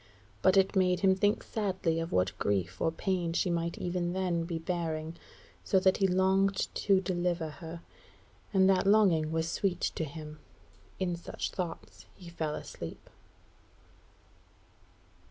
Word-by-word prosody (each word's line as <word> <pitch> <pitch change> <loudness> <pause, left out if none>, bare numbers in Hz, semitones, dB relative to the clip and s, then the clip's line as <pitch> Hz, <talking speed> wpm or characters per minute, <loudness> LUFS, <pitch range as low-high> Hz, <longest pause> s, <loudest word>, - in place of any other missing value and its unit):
But 190 +1 +4
it 195 +1 +3
made 180 -1 +3
him 190 -1 +5
think 205 +3 +1
sadly 185 -6 -1
of 165 +1 -4
what 90 +1 +1
grief 95 -2 -1
or 160 - +2
pain 175 0 -1
she 180 +1 +1
might 170 0 -1
even 175 -1 -2
then 180 -3 0
be 170 -1 -3
bearing, 165 -1 -3 0.5
so 190 - +3
that 190 0 +3
he 195 - +3
longed 190 +1 +2
to 195 -2 +3
deliver 175 -3 -1
her, 165 0 -9 0.7
and 190 -1 +4
that 195 0 +3
longing 185 -7 +4
was 160 0 0
sweet 180 +1 -1
to - - -2
him. 150 0 -8 0.6
In 180 -2 -1
such 170 - -5
thoughts 175 -3 -6
he 175 -2 -11
fell 160 -3 -3
asleep. - - -8
175 Hz, 145 wpm, -30 LUFS, 165-190 Hz, 0.7 s, him